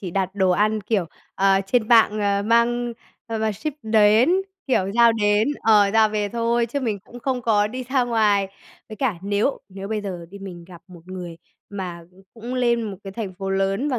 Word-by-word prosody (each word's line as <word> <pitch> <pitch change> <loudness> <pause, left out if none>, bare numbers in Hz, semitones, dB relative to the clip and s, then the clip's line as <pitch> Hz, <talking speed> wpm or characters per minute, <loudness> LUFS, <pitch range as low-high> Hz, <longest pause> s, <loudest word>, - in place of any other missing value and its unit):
chỉ 185 - -5
đặt 190 +1 -2
đồ 190 -2 +2
ăn, 215 +4 +1
kiểu, 195 -4 -1 0.3
ờ, 195 0 +3
trên 220 +1 +1
mạng 225 -3 +5 0.3
mang 235 +1 +2 0.3
ờ, 225 -1 -3
mà 220 0 0
ship 220 +10 -4
đến, 220 +4 +4 0.4
kiểu 245 -8 +1
giao 235 0 +6
đến, 210 +1 +2
ờ, 210 -3 +5
giao 220 -1 +5
về 210 -1 -2
thôi 235 +1 0
chứ 280 +5 -3
mình 220 -6 -2
cũng 240 +5 -13
không 255 0 -2
có 210 -2 +2
đi 255 +4 -5
ra 260 0 +1
ngoài. 210 -4 +2 0.4
Với 215 - -9
cả 255 -5 0
nếu 205 +7 0
nếu 195 0 -8
bây 215 -1 -2
giờ 180 -4 -6
đi, 200 - -10
mình 180 -3 -9
gặp 175 -1 -14
một 180 -2 -13
người 180 -3 -7 0.3
mà 180 -4 -6 0.3
cũng 235 +2 -6
lên 240 -2 +1
một 205 -3 -5
cái 195 - -7
thành 195 -3 -5
phố 195 +1 -5
lớn 195 +7 0
và 255 -4 -1
215 Hz, 205 wpm, -22 LUFS, 195-235 Hz, 0.4 s, giao